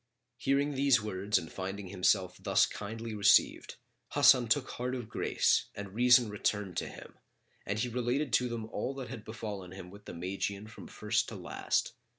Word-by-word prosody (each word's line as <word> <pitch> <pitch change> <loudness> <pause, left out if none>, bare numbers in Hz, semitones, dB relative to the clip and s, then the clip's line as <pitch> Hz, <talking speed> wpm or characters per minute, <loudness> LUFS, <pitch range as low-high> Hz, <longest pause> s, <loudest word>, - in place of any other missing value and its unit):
Hearing 140 +3 +1
these 135 -2 +4
words 105 -1 0
and 80 - -5
finding 95 0 -5
himself 90 -1 +1
thus - - +4
kindly 110 +2 -6
received, 105 -1 +3 0.4
Hasan 125 -2 +6
took 125 +4 +1
heart 125 +1 -3
of 120 -4 -5
grace - - +1
and 100 -2 -7
reason 125 +1 +5
returned 105 -2 -2
to - - -1
him - - -13 0.5
and 100 - -1
he 120 +4 0
related 125 +3 -1
to 125 +1 +3
them 115 -2 -4
all 130 +4 -4
that 130 -3 -6
had 115 -3 -7
befallen 105 -5 -7
him 90 -1 -10
with 100 +1 -14
the - - -8
Magian 100 +3 -3
from 110 - -11
first - - -1
to - - -8
last. - - -2
110 Hz, 175 wpm, -31 LUFS, 100-125 Hz, 0.5 s, Hasan